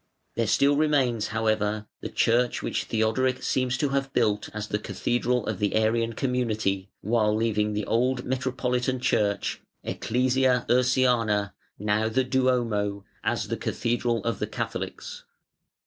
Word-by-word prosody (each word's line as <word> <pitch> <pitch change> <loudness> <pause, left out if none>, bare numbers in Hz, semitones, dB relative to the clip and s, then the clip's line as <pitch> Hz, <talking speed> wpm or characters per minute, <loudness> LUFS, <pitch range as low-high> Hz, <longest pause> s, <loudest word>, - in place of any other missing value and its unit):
There 115 -1 0
still 140 +7 +3
remains, 135 -8 +2
however, 110 -1 0
the - - -5
church 120 +1 +1
which - - -2
Theodoric 130 +4 0
seems 130 -1 0
to 145 +1 0
have 135 0 -1
built 105 -4 +1
as 105 0 -5
the 105 - -1
cathedral 120 +2 -1
of 110 -4 -3
the 105 -1 0
Arian 115 +1 +2
community, 110 -7 -1
while 110 0 +2
leaving 105 -1 +1
the 105 -1 -2
old 125 +2 +1
metropolitan 130 0 -1
church 100 -4 0 0.2
(Ecclesia 125 +1 +1
Ursiana, 120 -5 +2 0.2
now 105 +2 +1
the 130 +4 +1
Duomo) 120 -6 0 0.2
as - - -1
the - - -1
cathedral 120 0 -1
of 115 0 -2
the - - -1
Catholics. - - -5
115 Hz, 135 wpm, -26 LUFS, 105-130 Hz, 0.2 s, still